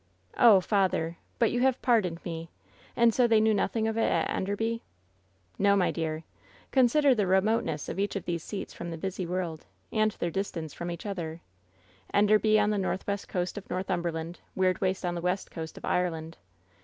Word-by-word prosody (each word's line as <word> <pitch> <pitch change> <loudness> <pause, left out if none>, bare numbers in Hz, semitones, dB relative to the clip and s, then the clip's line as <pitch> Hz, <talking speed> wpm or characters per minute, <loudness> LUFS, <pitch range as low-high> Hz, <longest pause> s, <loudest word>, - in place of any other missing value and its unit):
" - - -38
*0h, 215 -6 +7
father! 180 -5 +1 0.2
But 230 -3 +3
you 245 - 0
have 260 0 +2
pardoned 195 -9 +1
me 165 -1 -5 0.5
I - - -2
And 230 -1 +6
so 245 +1 +4
they 225 -2 +5
knew 220 0 +4
nothing 220 +2 0
of 225 0 -2
it 225 - +2
at - - +1
Enderby 225 +4 -1
V - - -21 0.4
" 95 0 -38
'No, 200 0 +5
my 185 -3 +2
dear. 160 -1 -3 0.5
Consider 270 +2 +5
the 210 -5 0
remoteness 190 -5 +1
of - - -4
each 200 +1 -1
of 195 - -3
these 170 -2 -2
seats 205 - -6
from 170 - -6
the 165 - -5
busy 185 +1 -4
world, 175 -3 -3 0.2
and 215 -1 +3
their 170 - -3
distance 165 -5 -3
from 170 - -5
each 170 +3 -6
other 170 -5 -4 0.4
— 95 0 -28
Enderby 215 +1 +4
on 210 0 +2
the 210 - 0
northwest 195 +1 -2
coast 180 +2 -2
of 200 - -18
North 185 +1 -3
umberland 170 -1 -2
— - - -23
^Weirdwaste 185 0 +1
on 175 - -1
the 170 - -4
west 180 +2 -1
coast 160 -2 -7
of - - -7
Ireland. 165 -3 -1
190 Hz, 205 wpm, -28 LUFS, 170-215 Hz, 0.5 s, 0h